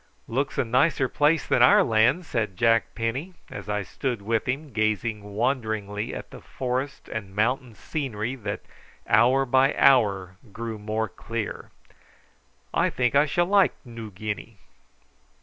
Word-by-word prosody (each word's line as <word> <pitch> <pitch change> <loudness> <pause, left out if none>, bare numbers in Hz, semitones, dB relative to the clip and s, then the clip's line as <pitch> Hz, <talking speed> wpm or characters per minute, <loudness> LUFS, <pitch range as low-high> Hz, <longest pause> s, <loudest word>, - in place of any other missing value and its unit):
"Looks 135 +4 -2
a - - +2
nicer 130 +3 +2
place 150 +3 +2
than - - +2
our 205 0 +7
land," 120 +7 +3
said 110 - -2
Jack 115 -1 +2
Penny, 130 +11 -3 0.2
as 100 0 -8
I 105 -1 -1
stood 120 +1 -4
with 115 +1 0
him 140 +1 -3
gazing 110 0 0
wonderingly 110 -4 -1
at - - -7
the - - -11
forest 130 +2 -4
and 100 -3 -6
mountain 120 +2 0
scenery 120 -1 -3
that 105 -4 -4 0.5
hour 130 +5 +4
by 130 +2 +3
hour 100 -8 +3
grew 115 0 -5
more 110 +1 -2
clear. 110 0 -5 1.0
"I - - +2
think 125 -2 0
I 145 +2 +4
shall 175 +4 +2
like 195 +1 +3
Noo 115 -2 -8
Guinea." 105 +2 -6
115 Hz, 145 wpm, -25 LUFS, 110-135 Hz, 1.0 s, our